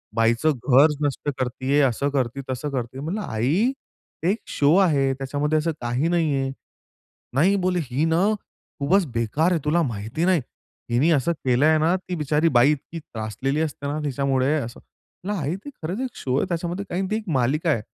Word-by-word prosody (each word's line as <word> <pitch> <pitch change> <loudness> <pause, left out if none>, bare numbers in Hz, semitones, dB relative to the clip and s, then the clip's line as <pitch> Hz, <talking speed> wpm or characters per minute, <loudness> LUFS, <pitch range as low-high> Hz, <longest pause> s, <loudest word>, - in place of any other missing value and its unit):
बाईचं 115 +7 +3
घरच 140 +3 +4
नष्ट 145 +1 -2
करत 130 -1 +1
आहे, 140 +3 +3
असं 140 +1 +1
करती 135 -1 -1
तसं 130 +3 -3
करती. 130 -1 -4
म्हणलं, 170 +9 -3
"आई! 160 - +1 0.5
एक 190 +6 +2
शो 145 +3 +3
आहे, 145 -8 +3
त्याच्यामध्ये 145 +3 -1
असं 165 +2 0
काही 120 +6 0
नाही 165 -4 +1
आहे." 135 -1 -1 0.8
"नाही 180 +9 +4
बोले 180 -1 +1
ही 135 +3 -1
ना 165 +2 +2 0.6
खूपच 180 +7 +3
बेकार 115 +9 +1
आहे, 175 - +2
तुला 160 +3 +3
माहिती 115 +5 -2
नाही. 185 -4 +3 0.5
हिने 130 +8 +3
असं 155 +2 +2
केलं 130 +2 +3
आहे 155 0 +5
ना, 165 +4 +3
ती 185 -1 -6
बिचारी 150 +1 +1
बाई 130 +5 +6
इतकी 150 +3 -5
त्रासलेली 130 +2 -3
असते 145 -2 -3
ना 145 +2 -2
तिच्यामुळे" 135 0 +1
असं. 120 -1 -7 0.6
"आई 150 +3 -1
ते - - -5
खरंच 180 +9 -3
एक 260 -3 -4
शो 130 -1 -2
आहे 165 - +1
त्याच्यामध्ये 175 +3 -3 0.3
ती - - +2
एक 220 -3 -7
मालिका 150 +7 +1
आहे 115 - 0
145 Hz, 180 wpm, -23 LUFS, 130-165 Hz, 0.8 s, बाई